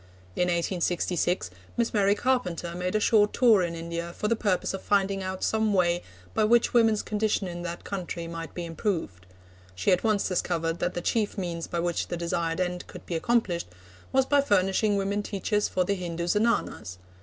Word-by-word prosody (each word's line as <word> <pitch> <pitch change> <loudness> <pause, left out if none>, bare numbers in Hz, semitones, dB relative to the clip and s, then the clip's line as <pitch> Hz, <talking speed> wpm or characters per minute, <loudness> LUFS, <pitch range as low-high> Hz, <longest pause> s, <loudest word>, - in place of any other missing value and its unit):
In 180 - +1
1866, 175 - 0 0.3
Miss 235 -1 +1
Mary 200 -1 +3
Carpenter 190 -9 -1
made 180 +3 -2
a - - +4
short 210 -1 +4
tour 230 -6 +5
in 170 -1 -2
India 170 +1 -5
for 210 - -1
the 230 - +2
purpose 200 -5 0
of 195 - -4
finding 195 -1 +1
out 185 0 -4
some 220 -2 +1
way 175 -1 +2 0.3
by - - +2
which 235 +2 +4
women's 225 -3 +4
condition 210 -2 0
in 175 -1 -6
that 170 0 -5
country 180 -3 -4
might 165 0 -7
be 175 - -4
improved. 165 - -3 0.5
She 95 - +1
at 180 - +3
once 215 -3 +2
discovered 170 -2 -1
that 180 - -1
the 175 - -2
chief 215 +3 0
means 170 -3 -3
by 170 - -2
which 175 -1 -1
the 175 - -3
desired 170 0 -1
end 180 -1 -2
could - - -11
be - - -5
accomplished 185 -2 +1 0.4
was 265 0 +3
by 285 +1 +4
furnishing 200 -3 +2
women 200 +1 0
teachers 205 +1 -1
for 185 - +1
the 200 - 0
Hindu 175 -3 -3
Zenanas. 210 - 0
185 Hz, 190 wpm, -27 LUFS, 170-210 Hz, 0.5 s, tour